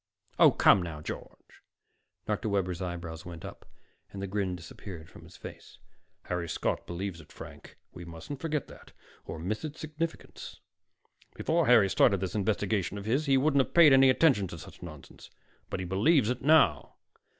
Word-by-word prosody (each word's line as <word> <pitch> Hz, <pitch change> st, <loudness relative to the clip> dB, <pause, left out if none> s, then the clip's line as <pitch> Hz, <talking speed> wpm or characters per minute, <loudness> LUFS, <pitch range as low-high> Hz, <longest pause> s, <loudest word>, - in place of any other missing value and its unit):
"Oh, -, -, +9 dB
come 100 Hz, -, +5 dB
now, 85 Hz, -3 st, -6 dB
George." 75 Hz, -, -9 dB, 0.6 s
Dr. 105 Hz, 0 st, -2 dB
Webber's 95 Hz, -3 st, -1 dB
eyebrows 85 Hz, -2 st, -5 dB
went 85 Hz, -2 st, -9 dB
up -, -, -11 dB, 0.4 s
and 100 Hz, -, -8 dB
the 100 Hz, -, -3 dB
grin 95 Hz, -1 st, -2 dB
disappeared 85 Hz, -1 st, -10 dB
from -, -, -15 dB
his -, -, -15 dB
face. -, -, -11 dB, 0.5 s
"Harry 90 Hz, -1 st, -3 dB
Scott -, -, -2 dB
believes 85 Hz, 0 st, -5 dB
it, 75 Hz, -, -19 dB
Frank. -, -, -12 dB, 0.2 s
We 90 Hz, -, -9 dB
mustn't 85 Hz, -, -8 dB
forget 155 Hz, -3 st, -2 dB
that, -, -, -15 dB, 0.3 s
or -, -, -6 dB
miss 95 Hz, -, -4 dB
its 155 Hz, 0 st, -6 dB
significance. 160 Hz, +1 st, -6 dB, 0.8 s
Before 165 Hz, -1 st, +1 dB
Harry 120 Hz, -5 st, +6 dB
started 95 Hz, +1 st, +3 dB
this 95 Hz, -1 st, -3 dB
investigation 100 Hz, -2 st, -1 dB
of 100 Hz, -, -7 dB
his, 135 Hz, +7 st, 0 dB
he 135 Hz, -1 st, +4 dB
wouldn't 140 Hz, 0 st, +3 dB
have -, -, -14 dB
paid 165 Hz, -5 st, +8 dB
any 135 Hz, 0 st, +7 dB
attention 130 Hz, -, +3 dB
to 85 Hz, -, -8 dB
such 80 Hz, -, -13 dB
nonsense. 75 Hz, -5 st, -11 dB, 0.4 s
But -, -, -4 dB
he -, -, -4 dB
believes 110 Hz, -, +3 dB
it 125 Hz, -, -4 dB
now." 140 Hz, -, +3 dB
100 Hz, 170 wpm, -29 LUFS, 85-135 Hz, 0.8 s, Oh